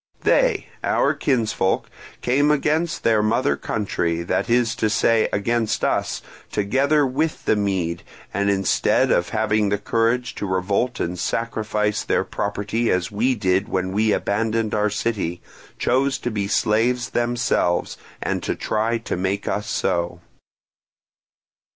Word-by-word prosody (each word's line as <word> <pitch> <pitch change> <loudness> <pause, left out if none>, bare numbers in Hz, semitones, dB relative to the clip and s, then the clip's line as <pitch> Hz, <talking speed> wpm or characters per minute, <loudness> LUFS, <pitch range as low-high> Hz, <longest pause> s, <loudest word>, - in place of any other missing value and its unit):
They, - - +3 0.2
our - - +2
kinsfolk, 115 -8 0 0.4
came 140 +4 +3
against 155 +3 +1
their 110 -2 +3
mother 115 +6 +1
country, 85 -5 -2
that 100 - -1
is 120 -1 +3
to 110 - +1
say 115 +1 +3
against 115 +2 0
us, - - 0 0.3
together 135 +8 +2
with 150 +5 -2
the - - +3
Mede, 95 -5 -1 0.3
and, 100 0 +1
instead 95 -2 +2
of 85 - +2
having 110 -1 +1
the 100 - +1
courage 115 +4 0
to 100 - -3
revolt 100 +7 0
and 90 +1 -2
sacrifice 105 -2 -1
their - - +1
property 105 +3 -2
as 90 +5 0
we 120 +5 +1
did 95 0 +1
when 95 -2 -1
we 105 +2 +2
abandoned 110 +2 0
our 105 0 +2
city, 100 -5 -2 0.4
chose 135 +2 +1
to 120 - -3
be 100 -2 -2
slaves 120 +5 +1
themselves, 120 -7 0 0.3
and - - -1
to - - -2
try 110 +2 0
to 115 - -4
make 95 +3 -2
us 105 +3 -2
so. 85 -5 -1
110 Hz, 140 wpm, -22 LUFS, 100-120 Hz, 0.4 s, They